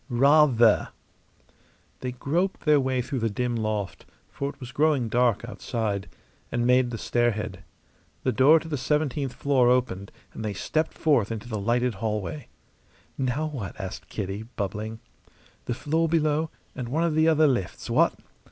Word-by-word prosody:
"Rather!" 130 Hz, -3 st, +5 dB, 1.1 s
They 125 Hz, -, -3 dB
groped 170 Hz, +10 st, -1 dB
their 150 Hz, -2 st, +4 dB
way 130 Hz, -2 st, 0 dB
through 135 Hz, +1 st, -3 dB
the 115 Hz, 0 st, 0 dB
dim 120 Hz, +3 st, -1 dB
loft 110 Hz, -3 st, -3 dB, 0.2 s
for 140 Hz, -, -3 dB
it 145 Hz, 0 st, -11 dB
was 125 Hz, -2 st, -8 dB
growing 145 Hz, -5 st, +2 dB
dark 120 Hz, -1 st, +2 dB
outside 105 Hz, -5 st, -3 dB, 0.4 s
and 120 Hz, 0 st, 0 dB
made 125 Hz, 0 st, +4 dB
the 115 Hz, -, -4 dB
stairhead. 110 Hz, -5 st, -1 dB, 0.6 s
The 130 Hz, -, +2 dB
door 140 Hz, +7 st, +6 dB
to 165 Hz, -, -10 dB
the 150 Hz, -4 st, -3 dB
seventeenth 145 Hz, -1 st, 0 dB
floor 130 Hz, -4 st, +3 dB
opened, 120 Hz, -6 st, 0 dB, 0.2 s
and 110 Hz, -, -6 dB
they 105 Hz, -2 st, -3 dB
stepped 155 Hz, -, -1 dB
forth 135 Hz, -10 st, +2 dB
into 115 Hz, +1 st, -5 dB
the 110 Hz, -3 st, -3 dB
lighted 120 Hz, +4 st, +1 dB
hallway. 105 Hz, -8 st, -3 dB, 0.7 s
"Now 135 Hz, +4 st, -1 dB
what?" 130 Hz, -12 st, -6 dB
asked 95 Hz, -1 st, -6 dB
Kitty, 100 Hz, 0 st, -4 dB
bubbling. 105 Hz, +2 st, -3 dB, 0.7 s
"The 120 Hz, -, -2 dB
floor 160 Hz, +5 st, 0 dB
below, 155 Hz, -1 st, +1 dB, 0.3 s
and 125 Hz, -3 st, -5 dB
one 160 Hz, +6 st, +1 dB
of 170 Hz, -2 st, +1 dB
the 160 Hz, +1 st, +3 dB
other 155 Hz, -1 st, +5 dB
lifts, 120 Hz, -11 st, -1 dB
what?" -, -, +3 dB
125 Hz, 160 wpm, -26 LUFS, 110-145 Hz, 1.1 s, door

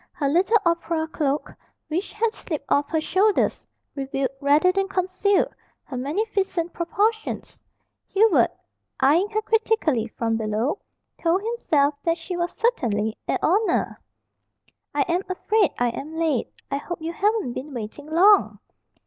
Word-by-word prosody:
Her 285 Hz, -, -1 dB
little 365 Hz, +9 st, +4 dB
opera 335 Hz, -1 st, 0 dB
cloak, 295 Hz, -2 st, -2 dB, 0.3 s
which 335 Hz, +5 st, -3 dB
had 440 Hz, +2 st, 0 dB
slipped 310 Hz, -10 st, -5 dB
off 285 Hz, 0 st, +2 dB
her 320 Hz, -, +1 dB
shoulders, 385 Hz, +6 st, +1 dB, 0.3 s
revealed, 270 Hz, -1 st, -2 dB
rather 295 Hz, +6 st, +4 dB
than 390 Hz, +1 st, 0 dB
concealed, 380 Hz, +1 st, +1 dB, 0.3 s
her 270 Hz, -, -8 dB
magnificent 350 Hz, -, -1 dB
proportions. 430 Hz, +6 st, -1 dB, 0.5 s
Hubert, 425 Hz, 0 st, +4 dB, 0.5 s
eying 335 Hz, +9 st, +4 dB
her 435 Hz, 0 st, -1 dB
critically 435 Hz, -, +1 dB
from 225 Hz, 0 st, -2 dB
below, 220 Hz, -, -1 dB, 0.4 s
told 350 Hz, +4 st, +2 dB
himself 310 Hz, -11 st, +1 dB
that 335 Hz, 0 st, +1 dB
she 355 Hz, +2 st, -6 dB
was 345 Hz, 0 st, -1 dB
certainly 220 Hz, -, 0 dB
a -, -, +1 dB
"oner!" 405 Hz, +6 st, +1 dB, 0.9 s
"I 290 Hz, -, 0 dB
am 345 Hz, +5 st, 0 dB
afraid 400 Hz, +1 st, +2 dB
I 245 Hz, 0 st, +2 dB
am 300 Hz, +7 st, -6 dB
late. 315 Hz, -7 st, 0 dB, 0.2 s
I 275 Hz, -, +1 dB
hope 345 Hz, +4 st, -6 dB
you 325 Hz, +1 st, -4 dB
haven't 410 Hz, -, 0 dB
been 275 Hz, +5 st, -6 dB
waiting 245 Hz, +4 st, -7 dB
long." 390 Hz, +6 st, +5 dB
335 Hz, 140 wpm, -24 LUFS, 280-400 Hz, 0.9 s, long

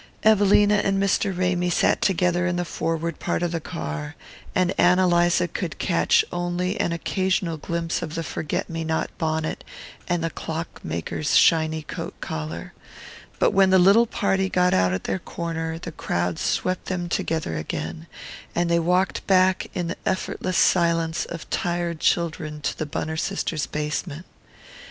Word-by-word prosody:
Evelina 205 Hz, -1 st, +5 dB
and 195 Hz, -1 st, +1 dB
Mr. 200 Hz, +1 st, +1 dB
Ramy 180 Hz, -1 st, +1 dB
sat 175 Hz, -, +2 dB
together 180 Hz, -1 st, +2 dB
in 180 Hz, -, 0 dB
the 175 Hz, 0 st, -1 dB
forward 165 Hz, 0 st, -2 dB
part -, -, -1 dB
of 175 Hz, -, 0 dB
the 165 Hz, -1 st, -2 dB
car, 160 Hz, -2 st, -5 dB, 0.4 s
and 185 Hz, 0 st, +2 dB
Ann 180 Hz, +1 st, +5 dB
Eliza 175 Hz, -1 st, +3 dB
could -, -, -4 dB
catch 455 Hz, -2 st, +3 dB
only 175 Hz, +2 st, -2 dB
an -, -, +1 dB
occasional 180 Hz, 0 st, -1 dB
glimpse 170 Hz, +2 st, -2 dB
of 155 Hz, -2 st, -5 dB
the 165 Hz, -, -2 dB
forget 155 Hz, -, -3 dB
me 165 Hz, -1 st, -4 dB
not 160 Hz, 0 st, -2 dB
bonnet 160 Hz, -1 st, -1 dB, 0.4 s
and 175 Hz, -2 st, 0 dB
the 165 Hz, -, -1 dB
clock 165 Hz, +1 st, -6 dB
maker's 85 Hz, -, -2 dB
shiny 160 Hz, -1 st, +4 dB
coat -, -, -7 dB
collar; 80 Hz, +2 st, -5 dB, 0.6 s
but -, -, +3 dB
when 195 Hz, -1 st, +4 dB
the 190 Hz, -, +6 dB
little 200 Hz, +6 st, +6 dB
party 195 Hz, -2 st, 0 dB
got 180 Hz, -1 st, +2 dB
out 90 Hz, 0 st, +3 dB
at 95 Hz, -, -2 dB
their -, -, -2 dB
corner 165 Hz, -1 st, -4 dB
the 165 Hz, 0 st, -7 dB
crowd 85 Hz, -, -2 dB
swept 185 Hz, 0 st, -1 dB
them 175 Hz, -2 st, -2 dB
together 160 Hz, -, -1 dB
again, 80 Hz, +1 st, -5 dB, 0.5 s
and 175 Hz, 0 st, +1 dB
they 170 Hz, -, +4 dB
walked 180 Hz, +3 st, +1 dB
back 185 Hz, -1 st, +3 dB
in 180 Hz, -2 st, -1 dB
the 170 Hz, -, -4 dB
effortless 185 Hz, -1 st, -1 dB
silence 165 Hz, -2 st, +2 dB
of 165 Hz, -, -7 dB
tired 170 Hz, -1 st, -1 dB
children 155 Hz, -3 st, 0 dB
to 145 Hz, -, -2 dB
the 155 Hz, -, -4 dB
Bunner 160 Hz, +2 st, -3 dB
sisters' 165 Hz, -4 st, -2 dB
basement. 150 Hz, +2 st, -3 dB
170 Hz, 160 wpm, -24 LUFS, 160-185 Hz, 0.6 s, the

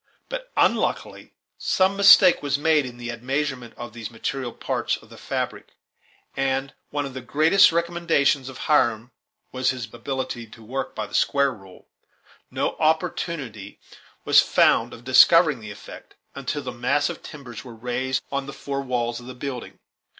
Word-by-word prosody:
But, -, -, -6 dB
unluckily, -, -, 0 dB, 0.2 s
some 190 Hz, +1 st, +2 dB
mistake 195 Hz, -2 st, +7 dB
was 140 Hz, -1 st, 0 dB
made 150 Hz, -2 st, +2 dB
in 120 Hz, -1 st, -10 dB
the 120 Hz, 0 st, -5 dB
admeasurement 130 Hz, 0 st, -3 dB
of 120 Hz, -2 st, -8 dB
these 115 Hz, -2 st, -7 dB
material 120 Hz, +2 st, -4 dB
parts -, -, -2 dB
of -, -, -19 dB
the -, -, -12 dB
fabric; -, -, -4 dB, 0.6 s
and, 135 Hz, 0 st, -1 dB
as -, -, -33 dB
one 145 Hz, -1 st, -2 dB
of 135 Hz, -, -7 dB
the 130 Hz, -, -6 dB
greatest 155 Hz, +11 st, +5 dB
recommendations 165 Hz, -5 st, +1 dB
of 130 Hz, -, -10 dB
Hiram 120 Hz, -6 st, +2 dB, 0.4 s
was 130 Hz, 0 st, 0 dB
his 120 Hz, -4 st, -4 dB
ability 130 Hz, -3 st, -4 dB
to 110 Hz, +1 st, -15 dB
work 130 Hz, +3 st, -4 dB
by -, -, -3 dB
the -, -, -15 dB
"square 140 Hz, -1 st, +2 dB
rule," 95 Hz, -4 st, -16 dB, 0.6 s
no -, -, -2 dB
opportunity 155 Hz, -, -2 dB, 0.5 s
was -, -, +7 dB
found -, -, +3 dB
of 115 Hz, -, -12 dB
discovering 150 Hz, +3 st, +6 dB
the 110 Hz, -2 st, -9 dB
effect 105 Hz, -, -12 dB, 0.2 s
until 140 Hz, +2 st, -4 dB
the 125 Hz, -, -4 dB
massive 135 Hz, +4 st, -1 dB
timbers 130 Hz, -7 st, -10 dB
were 120 Hz, -3 st, -11 dB
raised 125 Hz, +3 st, -2 dB
on 140 Hz, -1 st, -2 dB
the 140 Hz, -, -7 dB
four 140 Hz, 0 st, -4 dB
walls 120 Hz, -3 st, -2 dB
of 120 Hz, -, -12 dB
the 130 Hz, -, -8 dB
building. 125 Hz, -1 st, -6 dB
130 Hz, 165 wpm, -24 LUFS, 120-145 Hz, 0.6 s, mistake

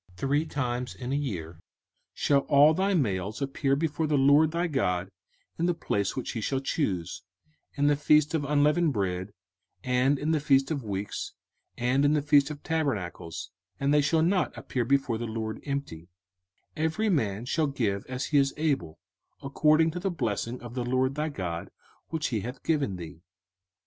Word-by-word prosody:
05:016:016 -, -, -23 dB
Three 145 Hz, +6 st, +1 dB
times 125 Hz, -4 st, -3 dB
in 125 Hz, 0 st, -5 dB
a -, -, +2 dB
year 90 Hz, -, -4 dB, 0.6 s
shall 140 Hz, -1 st, +3 dB
all 145 Hz, +2 st, +7 dB
thy 195 Hz, +3 st, +1 dB
males 100 Hz, -, -1 dB
appear 135 Hz, 0 st, 0 dB
before 155 Hz, +1 st, -1 dB
the 150 Hz, -1 st, +2 dB
LORD 145 Hz, +3 st, +5 dB
thy 170 Hz, +2 st, -1 dB
God 95 Hz, -, -1 dB, 0.5 s
in 170 Hz, -, +2 dB
the 175 Hz, -, +1 dB
place 100 Hz, -, -1 dB
which 130 Hz, -, -3 dB
he 115 Hz, -, -4 dB
shall 135 Hz, +5 st, 0 dB
choose; 100 Hz, -, -2 dB, 0.5 s
in 145 Hz, -, +1 dB
the 145 Hz, 0 st, +4 dB
feast 150 Hz, +1 st, +3 dB
of 160 Hz, -3 st, 0 dB
unleavened 150 Hz, +2 st, +2 dB
bread, 95 Hz, -2 st, -2 dB, 0.5 s
and 130 Hz, +3 st, +2 dB
in 150 Hz, +3 st, -1 dB
the 160 Hz, -, +2 dB
feast 135 Hz, 0 st, +3 dB
of 140 Hz, -5 st, -2 dB
weeks, 100 Hz, -1 st, -4 dB, 0.4 s
and 125 Hz, +3 st, +2 dB
in 145 Hz, +1 st, +4 dB
the 150 Hz, -, +2 dB
feast 145 Hz, -1 st, +4 dB
of 150 Hz, -1 st, -8 dB
tabernacles: 120 Hz, -, -3 dB, 0.3 s
and 140 Hz, +1 st, +2 dB
they 150 Hz, -, +5 dB
shall 160 Hz, +3 st, +2 dB
not 180 Hz, +2 st, +1 dB
appear 125 Hz, -, -2 dB
before 135 Hz, -3 st, +1 dB
the 120 Hz, -, -3 dB
LORD 110 Hz, 0 st, -4 dB
empty: 140 Hz, -, -4 dB, 0.7 s
05:016:017 -, -, -17 dB
Every 210 Hz, +8 st, +1 dB
man 110 Hz, -, 0 dB
shall 155 Hz, +4 st, +1 dB
give 110 Hz, -8 st, -1 dB
as 130 Hz, +1 st, -3 dB
he 145 Hz, -, +3 dB
is 135 Hz, 0 st, +1 dB
able, 140 Hz, -, -1 dB, 0.5 s
according 155 Hz, +3 st, +3 dB
to 180 Hz, -, -5 dB
the 195 Hz, +2 st, -1 dB
blessing 120 Hz, -, -2 dB
of 120 Hz, -1 st, -8 dB
the 125 Hz, -1 st, -2 dB
LORD 130 Hz, +2 st, +1 dB
thy 150 Hz, +2 st, -2 dB
God 85 Hz, -, -4 dB, 0.4 s
which 160 Hz, -1 st, -2 dB
he 115 Hz, -4 st, -1 dB
hath 125 Hz, +6 st, -7 dB
given 145 Hz, -, 0 dB
thee. 85 Hz, -2 st, -9 dB
140 Hz, 185 wpm, -28 LUFS, 110-150 Hz, 0.7 s, all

